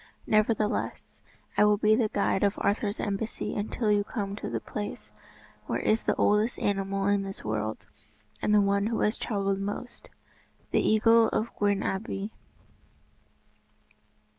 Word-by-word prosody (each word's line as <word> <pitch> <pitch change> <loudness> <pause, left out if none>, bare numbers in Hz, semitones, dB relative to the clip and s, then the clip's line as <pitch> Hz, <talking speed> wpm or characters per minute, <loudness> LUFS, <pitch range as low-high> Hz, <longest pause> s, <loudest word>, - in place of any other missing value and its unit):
Nevertheless, 215 0 0 0.3
I - - +5
will 210 0 +5
be 215 +1 +4
the 220 -2 +1
guide 200 -2 +1
of 200 0 +2
Arthur's 205 0 0
embassy 210 +1 -3
until 210 +1 -1
you 205 -1 +3
come 200 -2 -4
to - - -5
the - - -2
place 205 -1 -6 0.6
where - - 0
is 220 +1 +1
the - - +2
oldest 210 +3 +2
animal 195 -1 -1
in 200 0 +3
this 195 0 -5
world, 110 0 -3 0.6
and - - +1
the 210 -1 +6
one 200 +1 +2
who 225 0 -1
has 210 - +2
travelled 195 -3 -1
most, 205 +5 -6 0.6
the - - +3
Eagle 225 +1 +5
of 225 - -2
Gwern 205 -1 +1
Abwy." 195 +1 -3
205 Hz, 145 wpm, -28 LUFS, 200-215 Hz, 0.6 s, the